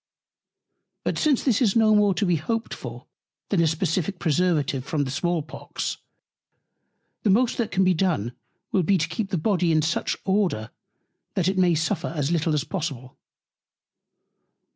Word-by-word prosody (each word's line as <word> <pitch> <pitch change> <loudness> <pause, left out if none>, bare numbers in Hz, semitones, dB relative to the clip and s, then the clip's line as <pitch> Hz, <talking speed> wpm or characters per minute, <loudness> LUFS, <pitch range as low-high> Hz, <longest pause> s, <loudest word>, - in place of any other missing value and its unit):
But - - -1
since 295 -5 +2
this 250 -5 +2
is 215 -6 +3
no 220 -1 +5
more 205 -2 +4
to 185 - +1
be 175 -3 +2
hoped 225 +9 -3
for, 120 0 -8 0.4
than 190 -5 +2
a 165 - +3
Specific 165 +4 -1
Preservative 150 -5 +1
from 145 +1 -1
the 130 - -4
Small 170 +3 0
Pox; 155 - -5 1.2
the 215 - +1
most 235 +6 +3
that 230 - 0
can 190 0 +2
be 185 0 +4
done, 160 - 0 0.4
will 190 - +3
be 190 +3 +3
to 160 -1 0
keep 195 +5 -3
the 185 - 0
Body 175 0 +1
in 155 -1 +3
such 165 +2 -1
Order, 190 - 0 0.6
that 185 -2 +1
it 190 0 +1
may 175 -2 +4
suffer 165 +2 -1
as 145 0 0
little 160 -2 +1
as 150 - 0
possible. 140 -8 -5
175 Hz, 165 wpm, -24 LUFS, 155-195 Hz, 1.2 s, no